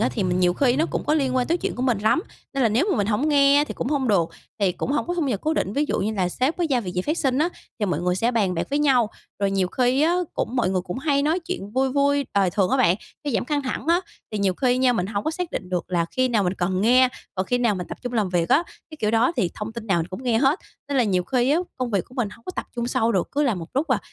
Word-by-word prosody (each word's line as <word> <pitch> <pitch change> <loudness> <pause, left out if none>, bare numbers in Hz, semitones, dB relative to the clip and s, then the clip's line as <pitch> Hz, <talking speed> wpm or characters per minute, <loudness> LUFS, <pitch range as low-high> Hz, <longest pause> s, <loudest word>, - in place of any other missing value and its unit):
á, 225 - +3
thì 220 - -1
mình 180 -1 0
nhiều 175 -1 +3
khi 250 +3 +2
nó 320 +4 +2
cũng - - -2
có 300 - +3
liên 265 -4 +1
quan 250 - +1
tới 335 - +1
chuyện - - -3
của 250 - -3
mình 250 -5 +2
lắm, 215 +10 +2 0.3
nên 275 - +1
là 235 - +4
nếu 240 - +2
mà - - +1
mình 205 - +1
hổng 225 +8 +1
nghe 280 -1 +5
á 290 - +4
thì - - -7
cũng 250 - -3
hông 275 -3 0
được, 175 -6 +3 0.3
thì 195 -3 +3
cũng 265 - -3
hổng 295 - 0
có 350 - -2
thu 335 -4 0
nhập 220 -7 -1
cố 310 - 0
định. 195 - -1
Ví 290 +6 +1
dụ - - 0
như 215 +3 -1
là 185 -3 0
sếp 260 - 0
với 350 - 0
giao 255 -3 +3
việc 185 -5 -5
gì 180 - 0
phát 305 - -1
sinh 265 -1 +1
á, 315 +3 +3 0.3
thì 210 - +1
mọi 175 -4 -1
người 180 0 +1
sẽ 230 +6 +1
bàn 205 -6 +1
bạc 165 - -2
với 285 - +1
nhau, 255 -7 +3 0.3
rồi 200 0 +1
nhiều 195 -2 +1
khi 255 +6 +2
á 335 +3 +3 0.2
cũng 250 - -2
mọi 240 - +2
người 185 -1 +1
cũng 180 +5 -5
hay 280 0 +1
nói 315 +4 +2
chuyện 335 - -5
vui 265 +1 +2
vui 280 0 +2
đời 195 -2 +3
thường 190 +1 +1
á - - +3
bạn, 175 +1 +4 0.3
để 290 - -1
giảm 230 - 0
căng 290 +2 -1
thẳng 260 - -4
á. 340 +2 +4 0.3
Thì 210 - -2
nhiều 195 -2 +1
khi 250 +4 +1
nha, 255 -1 +4
mình 185 -6 -1
hổng 200 0 -3
có - - +1
xác 345 +1 -4
định 185 - -5
được 180 -1 -1
là 170 -2 +1
khi 255 0 +1
nào 225 -4 +2
mình 180 0 0
cần 185 0 -1
nghe, 250 +4 +5 0.3
còn 185 0 -2
khi 245 - +1
nào 235 -4 +2
mình 180 -2 -5
tập - - -7
trung 245 -1 -4
làm 215 -5 +1
việc 175 -2 0
á, 315 - +4 0.3
cái 310 - -9
kiểu 210 - +1
đó. 230 +6 +3
Thì 175 - +1
thông 215 +1 -5
tin 230 -1 -7
nào 195 -5 +2
mình 165 - -2
cũng 185 +7 -8
nghe 240 -3 +2
hết, 275 +7 +3 0.3
nên 285 - -1
là 245 - +4
nhiều 185 -4 +1
khi 255 +2 +1
á 305 - +4 0.2
công 255 -2 -2
việc 200 -5 0
của 250 - -18
mình 240 -5 -1
hông 230 +2 -15
có 370 - -5
tập - - -3
trung 235 0 -1
sâu 235 -1 +1
được, 185 - 0
cứ 290 - +1
làm 240 -10 +1
một 165 -1 -7
lúc 285 +5 0
là - - +3
240 Hz, 330 wpm, -23 LUFS, 195-280 Hz, 0.3 s, nghe